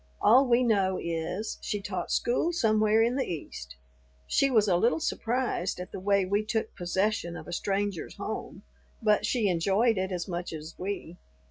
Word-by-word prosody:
All 255 Hz, +6 st, +6 dB
we 240 Hz, +1 st, +4 dB
know 195 Hz, -5 st, +2 dB
is, 170 Hz, +5 st, -3 dB
she 205 Hz, -, -2 dB
taught 185 Hz, -3 st, -4 dB
school 255 Hz, +8 st, +1 dB
somewhere 215 Hz, -7 st, +3 dB
in 240 Hz, +3 st, +1 dB
the 270 Hz, -, 0 dB
East. 65 Hz, -, -7 dB, 0.5 s
She 275 Hz, -, +2 dB
was 220 Hz, -5 st, +3 dB
a 185 Hz, -, +3 dB
little 230 Hz, -, +2 dB
surprised 235 Hz, -, -1 dB
at 180 Hz, +1 st, -7 dB
the -, -, -6 dB
way 200 Hz, 0 st, +2 dB
we 200 Hz, +3 st, +1 dB
took 220 Hz, 0 st, -2 dB
possession 180 Hz, 0 st, -1 dB
of -, -, -10 dB
a 175 Hz, -, -6 dB
stranger's 195 Hz, -1 st, -2 dB
home, -, -, -6 dB, 0.4 s
but 210 Hz, -1 st, +3 dB
she 235 Hz, -5 st, +1 dB
enjoyed 195 Hz, +5 st, +2 dB
it 190 Hz, 0 st, -2 dB
as 180 Hz, -2 st, -3 dB
much 175 Hz, -2 st, -4 dB
as 155 Hz, +1 st, -7 dB
we. 185 Hz, -2 st, -5 dB
200 Hz, 175 wpm, -28 LUFS, 180-225 Hz, 0.5 s, All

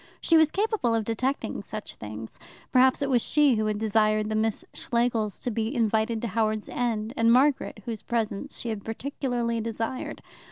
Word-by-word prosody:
She 330 Hz, -, +3 dB
was 315 Hz, -1 st, +6 dB
capable 400 Hz, -, +1 dB
of 225 Hz, -2 st, 0 dB
detecting 235 Hz, 0 st, -2 dB
such 215 Hz, +1 st, -7 dB
things. 110 Hz, +1 st, -8 dB, 0.3 s
Perhaps 260 Hz, +2 st, +4 dB
it 275 Hz, -, -1 dB
was 245 Hz, -2 st, +4 dB
she 295 Hz, 0 st, +4 dB
who 215 Hz, -1 st, 0 dB
had 210 Hz, -1 st, 0 dB
desired 215 Hz, 0 st, +2 dB
the 215 Hz, -, -1 dB
Miss 220 Hz, 0 st, 0 dB
Schlegels 235 Hz, -3 st, 0 dB
to 245 Hz, -, -3 dB
be 225 Hz, +4 st, -2 dB
invited 220 Hz, 0 st, +1 dB
to -, -, 0 dB
Howards 215 Hz, +1 st, 0 dB
End, 230 Hz, -2 st, -1 dB
and 230 Hz, -2 st, +4 dB
Margaret 255 Hz, -4 st, +2 dB
whose 225 Hz, -3 st, -4 dB
presence 230 Hz, +3 st, -2 dB
she 235 Hz, -, -4 dB
had 215 Hz, -3 st, -4 dB
particularly 235 Hz, -1 st, -2 dB
desired. 225 Hz, +3 st, -4 dB
230 Hz, 175 wpm, -27 LUFS, 215-250 Hz, 0.3 s, was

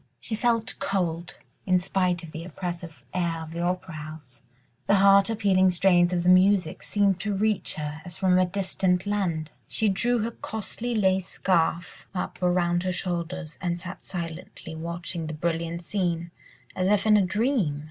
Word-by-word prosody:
She 230 Hz, -, -6 dB
felt 230 Hz, +1 st, +1 dB
cold 175 Hz, -4 st, -2 dB, 0.3 s
in 185 Hz, -1 st, +5 dB
spite 180 Hz, -1 st, 0 dB
of 165 Hz, -, -9 dB
the 160 Hz, +1 st, -6 dB
oppressive 170 Hz, -5 st, -6 dB
air 170 Hz, -3 st, -1 dB
of 160 Hz, -, -9 dB
the 170 Hz, +1 st, -4 dB
opera 180 Hz, 0 st, -2 dB
house. 150 Hz, -5 st, -9 dB, 0.5 s
The 200 Hz, -, +5 dB
heart 195 Hz, +1 st, +6 dB
appealing 195 Hz, -4 st, +3 dB
strains 175 Hz, -1 st, +4 dB
of 175 Hz, -1 st, 0 dB
the 180 Hz, -, +3 dB
music 185 Hz, -2 st, +4 dB
seemed 200 Hz, -3 st, +2 dB
to 210 Hz, -2 st, -1 dB
reach 210 Hz, 0 st, 0 dB
her, 150 Hz, -1 st, -5 dB
as 175 Hz, -2 st, -8 dB
from 185 Hz, -1 st, +3 dB
a 185 Hz, -, +4 dB
distant 185 Hz, -1 st, 0 dB
land. 175 Hz, -7 st, -1 dB, 0.2 s
She 220 Hz, -2 st, +1 dB
drew 235 Hz, +6 st, +1 dB
her 230 Hz, -, -2 dB
costly 230 Hz, +2 st, -5 dB
lace 190 Hz, -3 st, +2 dB
scarf 170 Hz, -2 st, 0 dB
up 180 Hz, -, -4 dB
around 175 Hz, -1 st, +2 dB
her 185 Hz, 0 st, -1 dB
shoulders, 175 Hz, -2 st, -4 dB
and 175 Hz, -2 st, -1 dB
sat 175 Hz, +1 st, -8 dB
silently 165 Hz, -2 st, -6 dB
watching 170 Hz, 0 st, -5 dB
the 155 Hz, -, -4 dB
brilliant 170 Hz, +1 st, -2 dB
scene, 170 Hz, -3 st, -2 dB, 0.4 s
as 185 Hz, 0 st, +1 dB
if 205 Hz, 0 st, +3 dB
in 215 Hz, -1 st, +6 dB
a 210 Hz, -, +5 dB
dream. 200 Hz, -, +1 dB
180 Hz, 170 wpm, -26 LUFS, 170-195 Hz, 0.5 s, heart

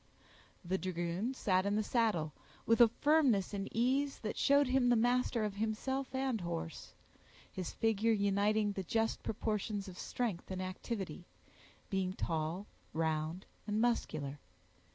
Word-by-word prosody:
The 190 Hz, +2 st, 0 dB
dragoon 180 Hz, +7 st, -2 dB
sat 185 Hz, -6 st, +2 dB
in 200 Hz, +1 st, 0 dB
the 215 Hz, -, +2 dB
saddle, 205 Hz, -, +1 dB, 0.3 s
with 230 Hz, +1 st, +4 dB
a 235 Hz, -, +10 dB
firmness 255 Hz, -5 st, +3 dB
and 200 Hz, 0 st, -3 dB
ease 265 Hz, +5 st, +1 dB
that 215 Hz, -, -3 dB
showed 285 Hz, +1 st, +4 dB
him 255 Hz, -1 st, +3 dB
master 245 Hz, -1 st, +2 dB
of 210 Hz, -, -2 dB
himself 260 Hz, +5 st, -2 dB
and 260 Hz, -5 st, 0 dB
horse,—his 170 Hz, -, -7 dB
figure 225 Hz, 0 st, +2 dB
uniting 205 Hz, 0 st, +2 dB
the 195 Hz, -, -3 dB
just 225 Hz, +5 st, 0 dB
proportions 210 Hz, -2 st, -2 dB
of 180 Hz, -2 st, -9 dB
strength 225 Hz, -8 st, -3 dB
and 190 Hz, -1 st, -3 dB
activity, 185 Hz, -2 st, -4 dB, 0.6 s
being 190 Hz, -1 st, 0 dB
tall, 165 Hz, +3 st, -2 dB, 0.3 s
round, 160 Hz, +2 st, -1 dB, 0.2 s
and 210 Hz, +1 st, 0 dB
muscular. 155 Hz, -, 0 dB
210 Hz, 130 wpm, -34 LUFS, 185-235 Hz, 0.6 s, a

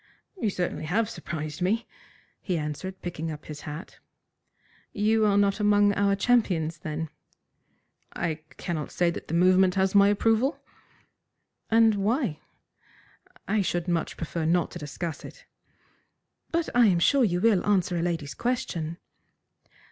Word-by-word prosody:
"You 275 Hz, -, -1 dB
certainly 180 Hz, -4 st, -3 dB
have 215 Hz, +7 st, 0 dB
surprised 155 Hz, -4 st, -6 dB
me," 215 Hz, +6 st, +1 dB, 0.6 s
he 180 Hz, -4 st, -1 dB
answered, 155 Hz, +5 st, -5 dB
picking 165 Hz, -2 st, -4 dB
up 150 Hz, 0 st, -9 dB
his 150 Hz, -1 st, -8 dB
hat. 150 Hz, +5 st, -8 dB, 0.9 s
"You 215 Hz, +1 st, +2 dB
are 200 Hz, -1 st, +3 dB
not 200 Hz, +1 st, +2 dB
among 205 Hz, -1 st, +4 dB
our 200 Hz, 0 st, +2 dB
champions, 185 Hz, -8 st, +1 dB
then?" 155 Hz, 0 st, -4 dB, 1.1 s
"I 160 Hz, -3 st, -2 dB, 0.2 s
cannot 160 Hz, -4 st, -3 dB
say 175 Hz, -1 st, +1 dB
that -, -, -8 dB
the 165 Hz, -, -2 dB
movement 185 Hz, +1 st, +4 dB
has 190 Hz, 0 st, +1 dB
my 200 Hz, 0 st, +6 dB
approval." 225 Hz, +7 st, +2 dB, 1.1 s
"And 225 Hz, 0 st, +5 dB
why?" 205 Hz, -, 0 dB, 1.1 s
"I 210 Hz, +1 st, +2 dB
should 175 Hz, -2 st, -1 dB
much 170 Hz, -2 st, -1 dB
prefer 165 Hz, 0 st, -3 dB
not 170 Hz, +2 st, +1 dB
to -, -, -7 dB
discuss 150 Hz, +2 st, -5 dB
it." -, -, -12 dB, 1.0 s
"But 335 Hz, 0 st, 0 dB
I 245 Hz, -2 st, +6 dB
am 185 Hz, -4 st, +3 dB
sure 270 Hz, +10 st, +4 dB
you 175 Hz, -6 st, +1 dB
will 205 Hz, -2 st, +3 dB
answer 185 Hz, -4 st, +1 dB
a 170 Hz, -, 0 dB
lady's 165 Hz, -5 st, -2 dB
question." 170 Hz, -, -2 dB
185 Hz, 140 wpm, -27 LUFS, 165-210 Hz, 1.1 s, my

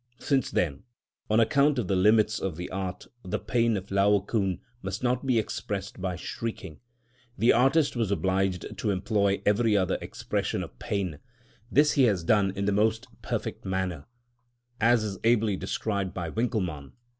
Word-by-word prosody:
Since 135 Hz, -1 st, 0 dB
then, 70 Hz, -6 st, -1 dB, 0.5 s
on 110 Hz, +1 st, +4 dB
account 140 Hz, +5 st, +3 dB
of 125 Hz, -, -1 dB
the 95 Hz, -, +1 dB
limits 105 Hz, +3 st, +4 dB
of 95 Hz, -4 st, -3 dB
the 90 Hz, +2 st, -6 dB
art, 95 Hz, -1 st, -4 dB, 0.2 s
the 95 Hz, +3 st, -2 dB
pain 115 Hz, +2 st, +1 dB
of 95 Hz, +1 st, -8 dB
Laocoon 100 Hz, -1 st, +2 dB, 0.2 s
must 95 Hz, +4 st, -5 dB
not 125 Hz, +2 st, 0 dB
be 125 Hz, -3 st, +3 dB
expressed 100 Hz, -3 st, -3 dB
by 90 Hz, -1 st, -2 dB
shrieking, 95 Hz, -2 st, -6 dB, 0.6 s
the 115 Hz, -, +5 dB
artist 135 Hz, +5 st, +3 dB
was 115 Hz, -4 st, 0 dB
obliged 95 Hz, -2 st, 0 dB
to 110 Hz, -, -1 dB
employ 100 Hz, 0 st, +1 dB
every 105 Hz, +1 st, +3 dB
other 95 Hz, -2 st, 0 dB
expression -, -, -3 dB
of -, -, -11 dB
pain; 95 Hz, -7 st, -3 dB, 0.5 s
this 150 Hz, +2 st, +5 dB
he 135 Hz, -, +4 dB
has 100 Hz, -7 st, +1 dB
done 100 Hz, +2 st, +3 dB
in 100 Hz, 0 st, -2 dB
the 100 Hz, -, +2 dB
most 110 Hz, +4 st, +1 dB, 0.2 s
perfect -, -, -4 dB
manner, 95 Hz, -5 st, -3 dB, 0.7 s
as 115 Hz, 0 st, +4 dB
is 100 Hz, -3 st, -4 dB
ably 110 Hz, -3 st, +3 dB
described 100 Hz, 0 st, -3 dB
by 85 Hz, -3 st, -3 dB
Winckelmann 105 Hz, -, -1 dB
(Works, 65 Hz, -, -18 dB
vol. -, -, -40 dB
100 Hz, 170 wpm, -27 LUFS, 95-115 Hz, 0.7 s, the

